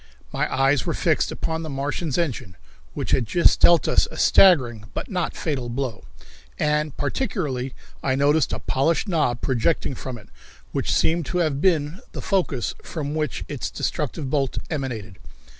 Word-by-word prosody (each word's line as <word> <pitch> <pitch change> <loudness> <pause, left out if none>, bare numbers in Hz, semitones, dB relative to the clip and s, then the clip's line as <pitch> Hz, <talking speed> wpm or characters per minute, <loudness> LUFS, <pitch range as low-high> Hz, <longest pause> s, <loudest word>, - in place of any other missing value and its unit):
My - - -1
eyes 135 0 +3
were - - 0
fixed - - +1
upon 160 0 -3
the 160 - -5
Martians' 140 +2 -2
engine, 130 - -2 0.4
which - - -3
had 120 -4 +2
just 170 +10 +4
dealt 170 -2 +6
us - - +3
a - - -10
staggering, 125 - +5
but - - -4
not 180 -3 -1
fatal, 135 -7 -2
blow, 120 - -4 0.5
and 150 -1 0
particularly 145 - -2 0.3
I 130 -1 +1
noticed 145 +1 +3
a - - -1
polished 160 +9 0
knob 150 -10 +1
projecting 135 +3 +1
from 130 -1 -6
it, 105 - -16 0.4
which - - -1
seemed 165 -3 +2
to 180 - -2
have 155 -5 +1
been 165 -2 +1
the - - -5
focus 175 - 0
from 150 -3 -4
which 155 -1 -2
its 145 -4 -4
destructive 150 -1 -3
bolt 135 -1 0
emanated. 120 - -4
145 Hz, 160 wpm, -23 LUFS, 130-160 Hz, 0.5 s, dealt